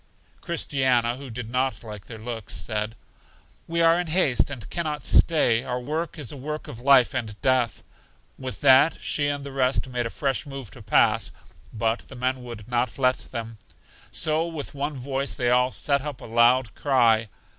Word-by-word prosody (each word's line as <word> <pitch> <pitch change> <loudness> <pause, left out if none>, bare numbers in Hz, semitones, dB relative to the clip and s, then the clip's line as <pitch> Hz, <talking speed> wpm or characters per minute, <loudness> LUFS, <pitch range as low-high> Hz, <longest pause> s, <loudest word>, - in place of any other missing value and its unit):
Christiana, 130 -8 +1
who 135 -1 -9
did 115 0 -6
not 130 +2 -1
like 105 -3 -8
their 115 - -9
looks, 115 -1 -5
said, 110 0 -3 0.7
We 170 0 +1
are 165 +1 +5
in 175 - -6
haste, 150 - +2
and 130 -6 -7
can 170 - -1
not 150 -1 -4
stay; 120 -8 +4
our 125 0 -3
work 155 +7 -3
is 145 -7 -4
a 145 - -8
work 150 +3 -5
of 115 - -8
life 135 -2 +5
and 110 -3 -4
death. 130 -3 +1 0.5
With 130 -1 -7
that 135 +3 +6
she 145 -1 0
and 145 -1 -2
the 140 - -7
rest 135 0 +1
made 125 -2 -2
a - - -6
fresh 135 +1 -1
move 135 -7 -8
to - - -12
pass, - - +2 0.4
but 115 +1 0
the 130 - -11
men 130 +1 -1
would 115 -4 -9
not 120 -1 -1
let 130 -1 +3
them. 115 -3 -7 0.5
So 160 +1 0
with 160 -4 -6
one 145 +1 -3
voice 135 +2 -2
they 120 -2 +1
all 125 +1 +3
set 140 +1 +1
up 145 -3 -6
a - - -10
loud 120 0 +3
cry. 115 -5 +3
130 Hz, 190 wpm, -25 LUFS, 120-145 Hz, 0.7 s, that